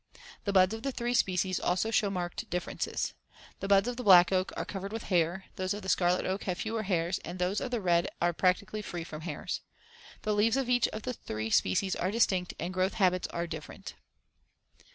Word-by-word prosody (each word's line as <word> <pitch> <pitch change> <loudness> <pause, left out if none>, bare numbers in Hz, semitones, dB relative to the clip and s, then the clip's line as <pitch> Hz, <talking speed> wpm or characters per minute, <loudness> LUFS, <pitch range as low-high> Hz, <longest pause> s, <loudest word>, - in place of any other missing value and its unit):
The 200 - +1
buds 190 +1 +5
of 225 - -5
the 275 - -2
three 240 -1 -2
species 185 -5 +1
also 185 +5 0
show 210 -2 +2
marked 180 -2 -4
differences. 180 0 -2 0.5
The 195 - -4
buds 200 +2 +4
of 245 -1 -3
the 250 - -4
black 180 -4 +8
oak 185 0 +1
are - - -2
covered 195 0 -5
with 225 0 -4
hairs, 175 +2 +2
those 185 +2 -1
of 205 - -7
the 190 - -4
scarlet 180 0 +2
oak 190 +2 -2
have 180 -2 -1
fewer 220 0 -2
hairs 180 -3 0
and 180 - -7
those 180 +3 0
of 260 - -3
the 240 -2 -1
red 170 -2 +2
are 175 - +2
practically 185 +4 +1
free 175 -4 -5
from 155 -2 -8
hairs. 160 -2 -4 0.6
The 215 - +1
leaves 220 +4 +3
of 265 -2 -1
each 245 -1 +4
of 215 - -6
the 250 - -2
three 110 - -5
species 185 - +2
are 185 - -1
distinct 190 -4 +1
and 180 - -3
the - - -10
growth 185 +1 +1
habits 185 -4 +2
are 170 0 -3
different. 160 -3 -8
185 Hz, 215 wpm, -30 LUFS, 175-215 Hz, 0.6 s, black